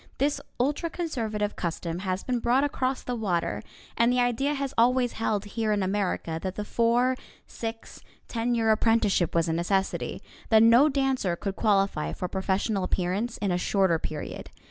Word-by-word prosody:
This 285 +2 0 0.2
ultra 290 +6 0
conservative 225 -12 -2
custom 170 0 -3
has 185 0 -2
been 250 -1 -1
brought 245 +4 +2
across 265 -2 -1
the 250 - -3
water, 175 - -1 0.3
and 235 +1 +3
the 250 - +2
idea 245 +4 +1
has 275 -1 -3
always 245 +1 +3
held 215 -2 -1
here 215 +1 -2
in 205 -2 +1
America 185 -4 -1
that 190 0 -4
the 210 - -4
four, 240 +4 +2 0.3
six, 225 0 -7 0.3
ten 235 +1 -1
year 225 -1 +3
apprenticeship 215 -6 +2
was 165 0 +2
a 160 - 0
necessity; 190 +3 -1 0.3
that 220 -1 +6
no 235 +6 +6
dancer 270 -10 0
could 195 +2 -4
qualify 195 - +1
for 180 - -4
a - - -3
professional 195 +1 -1
appearance 190 +6 -1
in 200 -2 -1
a 175 - +1
shorter 190 -3 +2
period. 155 -1 -6
220 Hz, 170 wpm, -27 LUFS, 190-245 Hz, 0.3 s, that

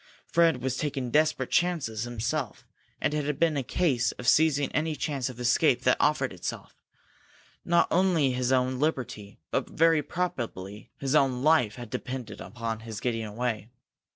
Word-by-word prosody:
Fred 165 -7 +2
was 130 0 -1
taking 135 -5 -3
desperate 155 +2 +2
chances 145 -11 0
himself, 120 +2 -3 0.3
and - - 0
it 150 -1 0
had 145 0 -2
been 165 -1 +2
a 140 - 0
case 130 -3 +1
of 125 - -8
seizing 150 -3 +4
any 155 0 -1
chance 140 -4 -2
of 125 -1 -10
escape 120 0 +3
that - - +4
offered - - +1
itself. - - -6 0.9
Not 170 0 +3
only 170 -6 +3
his 125 0 -1
own 130 0 +1
liberty, 125 -9 -2
but - - -1
very 165 -1 +3
probably 120 - -4
his 135 0 -2
own 135 -4 +2
life 150 -9 +3
had 120 -3 -9
depended 125 -5 -5
upon 115 -1 -5
his 110 -1 -7
getting 115 -2 -2
away. 110 -1 -3
130 Hz, 160 wpm, -27 LUFS, 120-155 Hz, 0.9 s, seizing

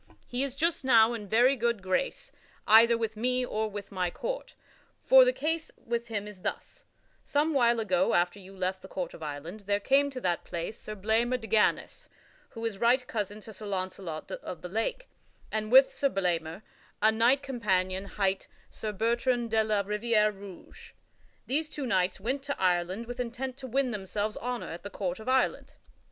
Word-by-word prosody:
He 245 +1 -3
is 275 -2 -1
not - - -17
just 330 -1 0
now 230 -3 +5
in 215 -3 -6
very 245 +6 +4
good 235 -4 -1
grace, 185 +7 -1 0.3
either 230 +2 +7
with 225 -1 -2
me 250 +3 0
or 220 -2 -2
with 205 -1 -7
my 185 -2 -1
court, - - -5 0.5
for - - +9
the - - +4
case 325 - -2
with 235 0 -3
him 210 -2 -3
is 205 -3 -11
thus: - - -5 0.4
Some 300 +2 +1
while 240 -3 +3
ago, 270 +4 +2
after 175 +3 +1
you 195 0 -13
left 185 0 -2
the - - -10
court 180 -3 -4
of - - -12
Ireland, 155 +6 -6
there 200 0 +2
came 275 +6 +3
to 265 -2 -6
that 175 -4 0
place 170 +5 -5
Sir 215 - -6
Blamor 225 +5 +1
de 225 - -9
Ganys 220 -1 +1 0.4
(who 230 -2 -7
is 210 -4 -3
right 245 +2 +3
cousin 210 -2 -4
to 220 - -10
Sir 210 +2 -9
Launcelot 185 -4 -4
of 180 - -7
the 180 - -5
Lake) 225 - -2 0.4
and 215 0 -2
with 265 +1 +7
Sir 280 - +1
Blamor 175 -2 -2 0.4
a 215 +1 +5
knight 240 +5 +3
companion 190 -7 0
hight 195 -1 -1 0.2
Sir 215 - -4
Bertrand 235 +2 0
de 220 -1 +3
la 215 -2 +1
Riviere 210 +1 +2
Rouge. 195 -3 -12 0.5
These 305 +4 0
two 290 -3 -5
knights 185 -6 +1
went 255 +7 -2
to 280 - -3
Ireland 185 +4 +1
with 245 +1 -7
intent 250 +2 -4
to 265 -2 -7
win 260 +1 0
themselves 210 0 -3
honor 245 0 -4
at 170 - -7
the 200 - -7
court 185 -2 -3
of 220 - -6
Ireland. 260 0 +1
220 Hz, 190 wpm, -29 LUFS, 195-250 Hz, 0.5 s, for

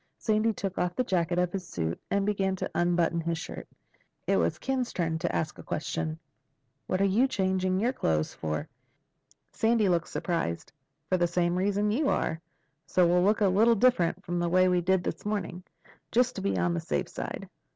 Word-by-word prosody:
Sandy 220 0 +1
took 195 -3 -4
off 180 0 0
the 255 - +1
jacket 175 -5 0
of 180 -1 +1
his 185 -2 -5
suit 80 -1 -3
and 200 0 +1
began 195 -2 0
to - - -4
unbutton 175 -1 +1
his 165 0 -2
shirt. - - -7 0.6
It - - +2
was 85 0 +1
Ken's 260 -2 -2
turn 165 -2 -1
to - - -1
ask 155 -1 -2
a - - -9
question. 155 +1 -3 0.7
"What're 185 +1 +1
you 215 +7 +3
changing 190 -5 0
your 240 +5 +1
clothes 80 - 0
for?" 75 -1 -3 0.8
Sandy 225 -2 +2
looked 170 -2 +1
surprised. 165 - -2 0.4
"For 185 - +2
the 175 -1 +2
same 175 0 +1
reason 205 +2 +1
you 275 +6 +1
are. 160 - -1 0.5
So 180 - +3
we'll 175 +1 +4
look 205 +3 +2
a 205 - +5
little 220 +5 +4
different 195 -6 +2
from 175 0 -2
the 175 0 0
way 185 +1 +4
we 180 -1 +2
did 190 +1 +2
this - - -4
morning—just 210 +4 -3
to - - -4
be 100 -1 0
on 90 -1 +1
the 85 - -1
safe - - -2
side." - - -6
185 Hz, 190 wpm, -28 LUFS, 170-205 Hz, 0.8 s, a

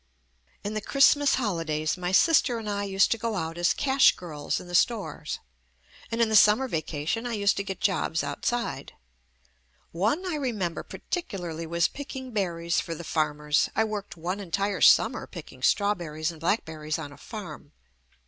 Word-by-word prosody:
In 205 - -3
the 215 - -2
Christmas 280 +4 +4
holidays, 165 -10 -1
my 180 -1 -3
sister 260 - +4
and 225 -2 -6
I 205 -1 -1
used 195 0 +2
to 230 - +1
go 230 -1 -2
out 165 -3 -3
as 175 - +3
cash 270 -1 +4
girls 155 -5 -4
in - - -11
the 175 - -9
stores, 220 +4 0 0.7
and 230 - -3
in 230 - +4
the 220 - +1
summer 215 +5 +6
vacation 160 - -2
I 240 - -3
used 205 -1 +2
to 200 - -1
get 190 -1 -5
jobs 170 -5 0
out 145 0 -5
side. 240 -1 -2 1.0
One 220 - 0
I 350 -4 -2
remember 210 - -2
particularly 175 - -5
was 170 +1 +2
pick 285 0 -8
ing 260 -1 -6
berries 170 -5 -1
for 165 - -5
the 170 - -8
farmers. 150 -2 +1
I 220 - +3
worked 210 -4 -5
one 180 +5 -3
en 190 - -9
tire 200 +4 -1
summer - - +5
picking - - -11
strawberries 170 -6 +1
and 165 - -13
black 200 +7 +1
berries 155 0 -4
on 150 -3 -7
a - - -12
farm. 175 -9 -9
195 Hz, 180 wpm, -27 LUFS, 165-225 Hz, 1.0 s, summer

